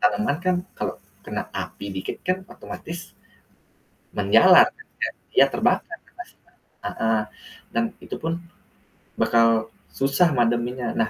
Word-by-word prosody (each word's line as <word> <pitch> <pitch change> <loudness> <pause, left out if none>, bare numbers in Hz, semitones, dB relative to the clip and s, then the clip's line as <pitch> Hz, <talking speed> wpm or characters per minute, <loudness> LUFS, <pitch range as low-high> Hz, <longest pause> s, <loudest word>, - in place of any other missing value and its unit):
tanaman 230 - +2
kan 185 0 +3 0.2
kalo - - -1 0.3
kena - - -2
api 100 - -5
dikit 95 - -4
kan 185 +1 +2
otomatis, 175 -1 -8 1.0
menyala - - +7
kan 440 - -17 0.5
dia - - +8
terbakar 335 - +1
lokasinya 360 0 -14 0.3
heeh, 110 -1 +1 0.5
dan 235 - +2 0.2
itupun 165 +1 -3 0.9
bakal 115 -1 +4 0.3
susah 140 +6 +3
mademinya. 120 +1 +1
Nah, 110 - +2
135 Hz, 110 wpm, -24 LUFS, 115-185 Hz, 1.0 s, dia